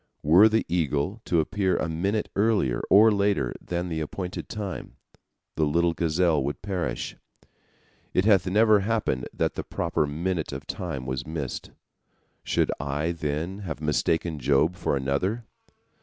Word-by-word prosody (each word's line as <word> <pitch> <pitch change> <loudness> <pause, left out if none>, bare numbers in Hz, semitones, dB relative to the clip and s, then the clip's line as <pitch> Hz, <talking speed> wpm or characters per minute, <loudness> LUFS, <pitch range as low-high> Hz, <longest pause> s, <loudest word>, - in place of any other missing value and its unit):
Were 90 +8 +7
the 110 +1 +1
eagle 85 +4 -1
to 85 - +2
appear 95 +1 0
a - - -1
minute 95 +7 -1
earlier 100 - +2
or 110 +3 +7
later 100 - +1
than 90 0 -3
the 80 -2 -3
appointed 90 +4 -5
time, 100 -4 -5 0.6
the 80 - +1
little 85 +3 +2
gazelle 85 -2 +1
would 70 +2 -4
perish. 95 -4 -3 1.0
It 90 - +1
hath 100 -4 +4
never 105 +2 +5
happened 100 - -1
that - - -1
the - - -4
proper 75 - -1
minute 85 +3 -2
of - - -6
time 65 -1 -4
was 65 +1 -4
missed. 75 -5 -4 0.7
Should - - +1
I, 75 +4 -1
then, 85 +3 -3
have 90 -8 -5
mistaken 80 +1 0
Job 70 +6 +2
for 70 - -1
another? 90 - -1
85 Hz, 145 wpm, -26 LUFS, 75-100 Hz, 1.0 s, Were